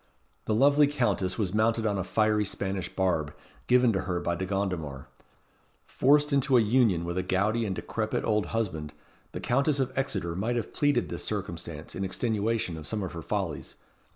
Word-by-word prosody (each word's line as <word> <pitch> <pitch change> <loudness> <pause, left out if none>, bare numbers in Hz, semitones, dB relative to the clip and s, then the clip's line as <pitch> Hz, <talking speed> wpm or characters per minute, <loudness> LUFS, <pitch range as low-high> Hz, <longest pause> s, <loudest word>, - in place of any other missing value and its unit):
The 110 - +1
lovely 145 +4 +5
Countess 120 -10 0
was 100 -4 -1
mounted 110 +1 +2
on 100 -2 0
a - - -1
fiery 105 +2 +2
Spanish 95 -1 -3
barb, 80 -6 -1 0.3
given 125 -2 +4
to 95 - 0
her 90 -2 -2
by 85 - -1
De 95 +2 -3
Gondomar. 90 -9 -3 0.8
Forced 145 +2 +3
into 135 -1 +4
a - - +6
union 110 -6 +3
with 85 +2 -2
a - - +1
gouty 100 +5 0
and 95 - -2
decrepit 110 +2 -2
old 105 -4 +1
husband, 85 -10 -3 0.4
the - - -5
Countess 140 +3 +1
of 130 0 -1
Exeter 95 -11 -2
might 110 +6 -1
have 115 -3 -3
pleaded 145 -4 +1
this - - -5
circumstance - - -5
in 95 - -3
extenuation 110 -2 -1
of 80 -1 -8
some 105 -2 -2
of 95 - -5
her 85 - -6
follies. 85 -7 -3
105 Hz, 180 wpm, -28 LUFS, 90-120 Hz, 0.8 s, a